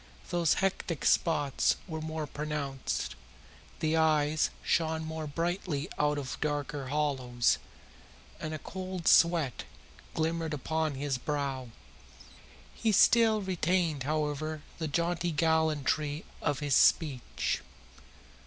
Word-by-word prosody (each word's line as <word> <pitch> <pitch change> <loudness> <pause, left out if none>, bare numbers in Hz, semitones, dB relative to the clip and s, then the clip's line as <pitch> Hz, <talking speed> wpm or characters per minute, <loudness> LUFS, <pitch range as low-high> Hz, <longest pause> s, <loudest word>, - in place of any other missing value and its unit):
Those 170 -2 +3
hectic 185 -5 -1
spots 150 -5 +3
were 160 -3 -4
more 155 0 -3
pronounced, 145 -2 -3 0.7
the 155 0 +2
eyes 155 -1 +3
shone 160 -1 +1
more 160 -1 -4
brightly 165 0 -2
out 150 0 +2
of 135 -3 -5
darker 145 -2 -2
hollows, 130 -4 +1 0.8
and 155 - -4
a 155 - -3
cold 185 +1 -6
sweat 165 -7 +4 0.5
glimmered 160 -1 -1
upon 160 +1 -1
his 135 -1 -2
brow. 135 -3 -2 1.0
He 225 - 0
still 220 +1 +5
retained, 175 -4 0
however, 150 +1 -2 0.2
the 160 - -1
jaunty 170 +3 0
gallantry 155 -2 +1 0.2
of 145 -1 -1
his 145 -2 0
speech. 140 -7 +2
155 Hz, 105 wpm, -30 LUFS, 145-165 Hz, 1.0 s, still